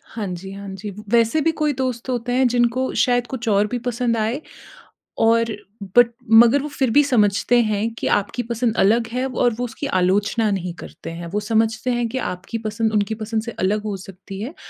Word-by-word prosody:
हाँ 215 -3 -3
जी, 185 +1 -6
हाँ 200 0 -8
जी। 200 +1 -7 0.2
वैसे 235 +6 +3
भी 325 - +2
कोई 300 -1 +2
दोस्त 255 -1 -3
होते 245 -1 -2
हैं 255 0 +4
जिनको 245 +2 +1
शायद 245 -1 +1
कुछ 245 -3 -6
और 205 +1 +3
भी 245 - -3
पसंद 235 -1 0
आए। 225 +7 -1 0.8
और 230 0 +4 0.5
बट 245 -1 +8 0.2
मगर 235 +5 +7
वो 300 - -4
फिर 265 -3 -1
भी 290 +6 +5
समझते 235 -1 +3
हैं 215 0 0
कि - - -3
आपकी 205 +4 -1
पसंद 235 0 -1
अलग 225 +4 +3
है 255 +1 -1
और 245 -2 +1
वो 245 - -3
उसकी 245 +4 -5
आलोचना 205 +2 +1
नहीं 180 -3 -2
करते - - -9
हैं। 170 +1 -7
वो 210 - +1
समझते 220 +3 0
हैं 240 -1 0
कि 260 +3 -3
आपकी 180 +3 -4
पसंद 220 0 -1
उनकी 210 0 +1
पसंद 220 0 -3
से 235 - -6
अलग 205 +3 +1
हो 210 -2 -3
सकती 190 +1 -10
है 250 +10 -5
225 Hz, 205 wpm, -21 LUFS, 205-245 Hz, 0.8 s, बट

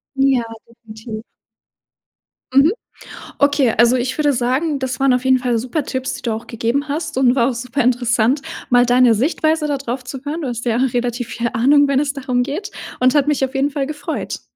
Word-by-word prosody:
Ja, 270 -3 +2 0.2
definitiv. 220 -1 -10 1.3
Mhm. 275 +6 +5 0.7
Okay, 285 -4 +3
also, 235 +2 +5
ich 255 +1 -2
würde 295 -2 +2
sagen, 265 +5 0
das 260 0 -3
waren 270 -1 +3
auf 250 0 0
jeden 260 -1 +3
Fall 245 -2 0
super 255 +6 -2
Tipps, 260 -1 -3
die - - -10
du 235 - -1
auch 220 +1 -7
gegeben 240 +5 -2
hast 305 0 -3
und 255 -2 +4
war 240 -1 +3
auch - - -2
super 250 +3 -3
interessant, 245 +1 +1 0.3
mal 245 0 +5
deine 245 -1 +4
Sichtweise 310 +6 0
da 290 -1 -1
drauf 255 -1 -5
zu 255 +2 -7
hören. 310 +4 -3
Du 285 - -3
hast 240 -1 -5
ja 235 -2 +1
relativ 245 -1 -1
viel 235 0 -2
Ahnung, 285 +4 +4
wenn 275 -1 +2
es 285 -1 -1
darum 255 -3 -1
geht 335 +11 -5 0.3
und 255 +3 +3
hat 290 -1 +3
mich 290 -2 +2
auf 265 +1 -10
jeden 275 +2 +1
Fall 275 -1 -2
gefreut. 295 -1 -5
260 Hz, 200 wpm, -19 LUFS, 245-285 Hz, 1.3 s, Mhm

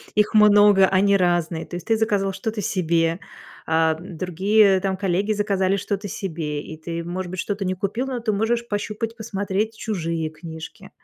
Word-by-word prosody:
их 210 0 +2
много, 205 -2 +6
они 200 +1 +3
разные, 175 -3 0
то - - -8
есть 175 +2 -7
ты 225 - +3
заказал 205 -3 +1
что-то 215 +2 -4
себе, 170 -2 0 0.5
а, 160 0 +2
другие 190 +3 +2
там 190 0 -1
коллеги 195 +2 0
заказали 200 -2 +1
что-то 200 +1 -3
себе, 160 -6 -4
и 155 - -9
ты, 165 +1 -5
может 175 +1 -5
быть, 185 - -5
что-то 200 +1 -2
не 185 - 0
купил, 205 +7 -2
но 260 -2 -3
ты 225 -2 -1
можешь 230 +3 0
пощупать 215 +1 -3
и - - -35
посмотреть 210 -1 -2
чужие 165 -6 -2
книжки. 160 0 -10
195 Hz, 175 wpm, -23 LUFS, 170-210 Hz, 0.5 s, много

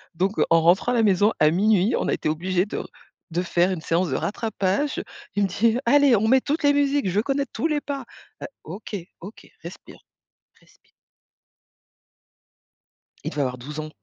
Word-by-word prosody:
Donc 190 +5 -1
heu, - - +4
en 165 0 +5
rentrant 175 +8 +3
à - - +1
la 230 - +3
maison 205 +1 +3
à 150 0 +5
minuit, 205 +4 +2
on - - -2
a - - +1
été - - -2
obligés 180 +4 0
de 210 - -6
r - - -7 0.4
de 175 +2 -1
faire 175 0 +1
une 180 - -3
séance 165 +2 0
de 130 - -1
rattrapage. 215 - -2 0.3
Il 205 - +2
me - - +2
dit: 225 +5 +1
«Allez, 285 -3 +5
on 215 +1 +1
met 260 +3 +4
toutes 300 +4 -2
les 285 0 +4
musiques, 285 0 +1
je - - -4
veux 210 - +4
connaître 275 +1 -2
tous 320 - -1
les 300 -2 0
pas». 280 -3 -5 0.4
Heu, - - -4 0.2
OK, 200 +5 -7 0.2
OK, 195 +6 -11 0.2
respire, 170 +2 -11 0.6
respire. - - -28 2.3
Il - - -3
devait 145 - -2
avoir 125 -2 -2
12 145 +5 -8
ans. 155 0 -5
200 Hz, 195 wpm, -23 LUFS, 175-255 Hz, 2.3 s, en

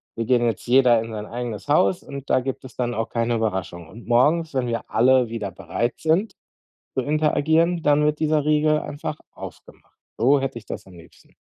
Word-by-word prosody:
Wir 115 - -2
gehen 120 0 +2
jetzt 115 - -2
jeder 125 -2 +5
in 115 0 -7
sein 105 -1 -5
eigenes 120 0 -6
Haus 175 +4 +2
und 140 -1 -9
da - - +4
gibt 130 +1 -5
es 130 - -12
dann 120 -1 -1
auch 115 -1 -3
keine 115 0 0
Überraschung. 95 -6 -3
Und 115 +1 -13
morgens, 150 +7 +2
wenn 130 -2 0
wir 115 -1 -4
alle 125 +1 +4
wieder 110 -3 -4
bereit 120 +6 -3
sind 165 +7 0 0.6
zu 130 - 0
interagieren, 155 +3 +2
dann 145 0 +3
wird 150 0 0
dieser 155 -1 +1
Riegel 155 0 +3
einfach 150 +1 -5
aufgemacht.“ - - -13 0.2
So 135 +5 +4
hätte 135 -2 -3
ich 115 - -10
das - - -7
am 95 - -15
liebsten. 85 -1 -18
130 Hz, 200 wpm, -23 LUFS, 115-150 Hz, 0.6 s, jeder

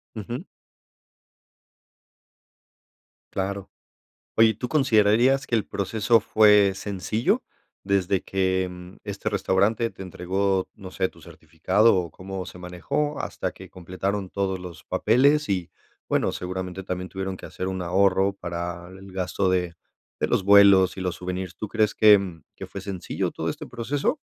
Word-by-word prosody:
Ujú. 115 +3 -6 2.9
Claro. 100 0 -3 0.7
Oye, 115 0 +7
¿y - - -3
tú 125 +4 -5
considerarías 130 -1 +3
que - - -2
el 110 -3 +2
proceso 110 +3 +2
fue 105 -2 +5
sencillo, 100 +3 -1 0.4
desde 95 -1 +1
que 95 -1 -2
este 100 -1 -3
restaurante 100 +3 +1
te - - -10
entregó, 95 +1 -1
no 95 -3 -10
sé, 95 0 -1
tu - - -19
certificado, 110 +1 +1
o 85 -3 -1
cómo 95 +2 -6
se 90 - -10
manejó 90 - -3
hasta - - -3
que - - -13
completaron 95 +2 -4
todos 95 -1 -1
los 90 -3 -10
papeles? 140 +7 +3
Y 90 -4 -1 0.4
bueno, - - +1
seguramente, 90 +1 -5
también 90 0 -4
tuvieron 95 -1 -4
que - - -10
hacer 95 - -5
un 95 -1 -3
ahorro, 95 +2 +2
para 85 -1 -5
el 95 +1 -12
gasto 95 +1 -1
de 90 -2 0 0.5
de - - +1
los 95 - +1
vuelos 100 -2 +6
y - - -6
los 90 -3 -2
souvenirs. 90 0 -5
¿Tú 110 - -4
crees 110 -1 +1
que 100 -6 +5 0.2
que - - -7
fue 100 - -7
sencillo 95 -2 -3
todo - - -4
este - - -7
proceso? 135 - -1
95 Hz, 145 wpm, -25 LUFS, 90-105 Hz, 2.9 s, Oye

